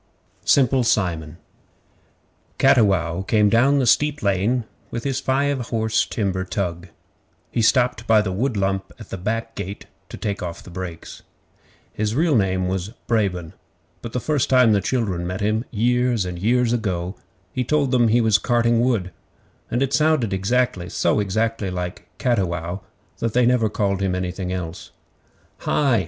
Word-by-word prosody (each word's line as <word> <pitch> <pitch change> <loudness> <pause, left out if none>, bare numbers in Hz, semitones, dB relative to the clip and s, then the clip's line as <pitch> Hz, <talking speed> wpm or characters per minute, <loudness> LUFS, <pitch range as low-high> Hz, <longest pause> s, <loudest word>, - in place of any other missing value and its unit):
Simple 130 -1 +4
Simon 85 -8 0 1.2
Cattiwow 95 -10 +3
came 105 +1 +3
down 130 +7 +4
the 135 - +2
steep 150 +4 +2
lane 100 +5 +1 0.3
with 115 - -5
his 135 -2 -1
five 140 +1 0
horse 110 -1 +1
timber 95 -4 -1
tug. 90 -2 -3 0.6
He 120 - 0
stopped 120 0 +2
by 110 -2 +5
the 95 - -2
wood 115 +4 -1
lump 95 0 -1
at 110 - -12
the - - -4
back 115 +4 -3
gate 100 -1 -6 0.2
to - - -8
take 100 -1 -3
off 85 -2 -6
the 90 - -12
brakes. 85 -2 -7 0.7
His 110 +1 -1
real 160 0 +2
name 95 -3 +1
was 95 +3 -3
Brabon, 95 -8 -1 0.5
but 115 - -6
the 125 - 0
first 145 +1 0
time 125 -3 +5
the 100 -1 +3
children 95 -9 -1
met 90 +2 -4
him, 110 +3 0
years 120 -1 +1
and 90 -1 -5
years 120 +4 +2
ago, 95 -5 -2 0.4
he 130 - 0
told 140 0 +1
them 120 -3 +4
he 120 +2 +3
was 110 -2 +4
'carting 120 0 +2
wood,' 115 -8 0 0.6
and 120 +3 +1
it 135 0 -2
sounded 155 -8 +2 0.6
so - - +1
exactly 110 +1 -1
like 90 -1 -5
'cattiwow' 90 - -1 0.4
that 115 -2 -1
they 125 0 +4
never 120 -3 +3
called 100 -2 -1
him 95 -2 0
anything 90 0 -3
else. 90 -1 -5 0.7
'HI! 135 -6 +2
110 Hz, 155 wpm, -22 LUFS, 95-125 Hz, 1.2 s, by